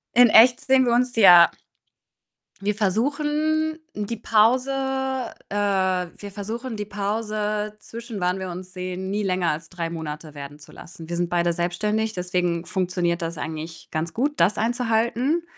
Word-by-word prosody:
In 245 -1 +7
echt 240 +3 +7
sehen 265 -1 +4
wir 240 - +2
uns 250 +1 +2
ja. 175 -5 +9 1.1
wir 210 +1 0
versuchen 295 - 0 0.2
die 210 +2 -3
Pause, 230 +4 +3 0.8
äh, - - -5
wir 190 -1 -1
versuchen 225 +4 -5
die 210 - -4
Pause, 210 +1 -2
zwischen 230 -1 -8
wann 180 +1 0
wir 190 -1 -5
uns 180 +1 -8
sehen, 185 +1 -5
nie 205 +2 -1
länger 185 -3 0
als 155 +2 -3
3 170 -2 -4
Monate 155 -2 -6
werden 145 0 -9
zu 150 - -16
lassen. 165 -1 -12
Wir 170 - -3
sind 175 0 -1
beide 175 0 +1
selbstständig, 210 +6 -1
deswegen 180 -2 -1
funktioniert 180 -1 -1
das 165 0 -4
eigentlich 160 +1 -7
ganz 160 +2 -3
gut, 285 +5 0
das 180 +5 +3
einzuhalten, 240 +6 0
200 Hz, 155 wpm, -23 LUFS, 175-230 Hz, 1.1 s, ja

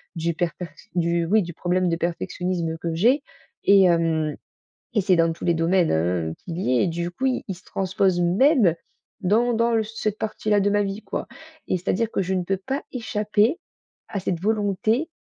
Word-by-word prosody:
du 170 0 -1
perfect 170 -1 -5
du, 170 -1 +1
oui, 210 +5 +3
du 170 - -7
problème 180 +2 0
de 165 - +1
perfectionnisme 170 0 -2
que 165 -2 -3
j'ai 240 - +3 0.4
et 195 -1 +6
hem 165 -3 +2 0.6
et 215 - +2
c'est 190 -1 +3
dans 165 -1 +3
tous 165 - -7
les 170 - +3
domaines, 170 +1 +2
hein, 80 0 0
qu'il 170 -1 -5
y 130 -8 +1
est - - +3
et - - +1
du 170 +1 -2
coup, 255 +9 -3
il 255 - -1
il 190 - -4
se 180 - -17
transpose 190 -1 0
même 195 - +4 0.5
dans 225 +6 +2
dans 230 +1 +2
l 220 - 0
cette 215 -1 -3
partie-là 215 -1 0
de 205 - +2
ma 205 0 +3
vie, 200 +2 -4
quoi - - -4 0.4
et 185 - +2
c'est-à-dire 200 +5 -1
que - - 0
je 190 - -2
ne 185 -1 0
peux 195 +2 -1
pas 265 +9 -3
échapper 220 - 0 0.5
à 200 - -3
cette 180 -2 -2
volonté 215 - 0
185 Hz, 195 wpm, -24 LUFS, 170-215 Hz, 0.6 s, et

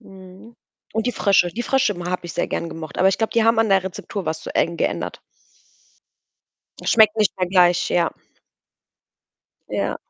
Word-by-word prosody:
Mhm. 190 +4 -15 0.4
Und 225 +2 -1
die 245 - 0
Frösche. 195 -4 +3
Die 230 +7 -5
Frösche 265 -6 +1
m 175 -1 -7
habe 180 -1 -3
ich 170 - -7
sehr - - -2
gerne 170 - -3
gemocht, 160 -3 -8
aber 185 - +4
ich 195 - +1
glaube, 225 - -1
die 230 -1 +2
haben 225 0 +3
an 225 - +1
der 195 -1 +3
Rezeptur 190 +1 -6
was 160 0 -2
zu - - -8
eng 170 0 +1
geändert. - - -3 1.6
Schmeckt 220 -1 +5
nicht 215 -2 +1
mehr 185 - +1
gleich, 180 -1 +3
ja. 170 -2 +2 1.6
Ja. - - -2
190 Hz, 180 wpm, -21 LUFS, 175-220 Hz, 1.6 s, Schmeckt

